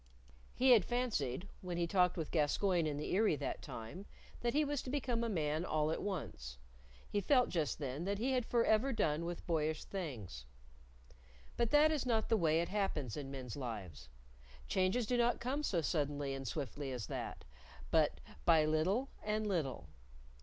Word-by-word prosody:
He 260 +1 +5
had 225 -6 +7
fancied, 200 - -1
when 180 -2 -4
he 170 - +1
talked 180 0 +3
with 160 -3 -3
Gascoyne 170 +2 +2
in 145 -1 -2
the 150 - -3
Eyry 210 -3 +4
that - - -4
time, 145 - -8 0.3
that 240 +2 -1
he 300 0 +4
was 290 -2 -1
to - - -7
become 250 -4 0
a 230 - 0
man 155 -4 0
all 155 -3 +1
at - - -2
once; 65 - -4 0.5
he 205 - -1
felt 250 +4 +4
just 160 -5 -1
then 140 +1 -4
that 200 +1 0
he 250 +6 0
had 255 -2 +2
forever 235 +2 +2
done 160 - 0
with 175 0 -5
boyish 155 -2 0
things. 115 - -6 1.1
But 235 -1 +1
that 300 +3 +6
is 300 -4 0
not 225 -3 +1
the 225 - +4
way 165 -3 +3
it 170 - -3
happens 185 - -1
in 140 -2 -5
men's 130 -4 -6
lives. 95 - -6 0.6
Changes 190 +6 +1
do 245 +3 +1
not 240 0 +2
come 265 +5 -1
so 185 - 0
suddenly 145 -2 -1
and 135 -1 -5
swiftly 145 -2 -4
as 125 -5 -4
that, - - -5 0.5
but - - +3 0.2
by 160 -2 +5
little 185 - +1
and 215 0 0
little. 165 -10 -2
175 Hz, 180 wpm, -36 LUFS, 145-230 Hz, 1.1 s, had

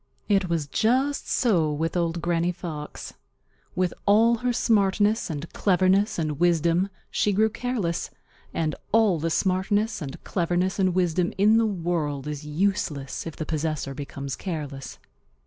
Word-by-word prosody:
It 195 -3 +2
was 165 -3 0
just 255 - +1
so 175 - +2
with 160 +3 -2
Old 170 -1 -1
Granny 170 0 +1
Fox. 155 -4 -7 0.6
With 180 -1 +1
all 225 +3 +5
her 245 +2 0
smartness 210 -2 +2
and 155 0 -4
cleverness 190 +1 +2
and 155 -3 -2
wisdom 175 +2 +2 0.2
she 210 - +1
grew 215 +2 +2
careless, 235 -8 -2 0.4
and 155 -2 -1 0.2
all 215 -6 +4
the 165 +2 -1
smartness 195 +4 0
and 135 -3 -7
cleverness 180 +2 0
and 185 -2 +2
wisdom 180 -1 +1
in 210 +3 +5
the 225 -1 +3
world 165 -7 -2
is 150 0 -5
useless 150 -4 -2
if 165 - -6
the 155 - -4
possessor 155 -3 -2
becomes 140 -1 -5
careless. 145 -7 -6
175 Hz, 145 wpm, -25 LUFS, 155-205 Hz, 0.6 s, all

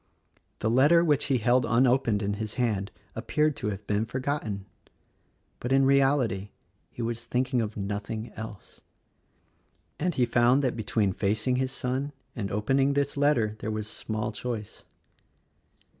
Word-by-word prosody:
The 110 - +1
letter 150 +8 +5
which 150 -4 +2
he 135 -3 +2
held 120 +3 +3
unopened 120 -2 +2
in 100 +1 0
his 110 -1 -3
hand 105 -6 0 0.3
appeared 150 -1 +1
to - - -3
have 100 0 -4
been 105 +2 0
forgot 140 +4 -2
ten 100 -3 -5 0.5
— - - -42
but, 125 - -4
in 135 0 +5
reality, 135 -7 +2 0.4
he 120 - -6
was 115 0 -3
thinking 125 0 0
of 110 -1 -4
nothing 105 +3 -4
else 110 -3 -9 0.6
— - - -41
and 175 +2 0
he 125 - +3
found 120 +4 +3
that 125 -3 0
between 105 -3 0
facing 110 +6 0
his 130 0 0
son 130 +4 -2 0.2
and 100 -4 -3
opening 135 +7 +2
this 140 0 0
letter 140 -7 +2
there - - -4
was 110 -1 -3
small 110 0 -3
choice. 110 -1 -6
120 Hz, 160 wpm, -27 LUFS, 105-135 Hz, 0.6 s, letter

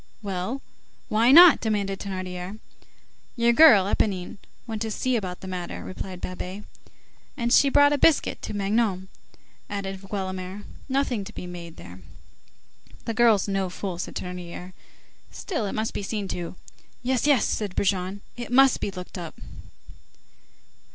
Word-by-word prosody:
"Well! 200 +7 -3 0.5
why 230 +4 +4
not?" 340 0 +9
demanded 200 -3 -1
Thénardier. 185 0 -5 0.8
"Your 235 0 +3
girl, 235 -9 +8
Éponine, 195 -2 -1 0.3
went 220 -3 -5
to 225 - -1
see 255 +4 -1
about 185 -5 -3
the 190 - -8
matter," 180 -2 -5
replied 185 -1 -7
Babet. 185 +2 -6 0.7
"And 240 -1 0
she 280 - +6
brought 285 +1 +5
a 290 - 0
biscuit 315 +1 +3
to - - -5
Magnon," 200 -2 0 0.6
added 195 -2 -4
Guelemer. 190 0 -5 0.3
"Nothing 265 -5 0
to 215 - -10
be - - -7
made 170 -2 -9
there." 90 +1 -11 1.1
"The 230 - -2
girl's 225 -4 +4
no 195 -2 -1
fool," 180 -1 -5
said - - -5
Thénardier. 180 0 -7 0.6
"Still, 315 - -3
it - - -4
must 220 +1 -2
be - - -3
seen 205 0 -3
to." 175 0 -5 0.5
"Yes, 260 +2 +1
yes," 285 -4 +4
said 205 -4 -2
Brujon, 190 0 0
"it 240 0 -7
must 270 0 +5
be - - -2
looked 180 -1 -8
up." 170 -2 -8
200 Hz, 145 wpm, -25 LUFS, 185-235 Hz, 1.1 s, not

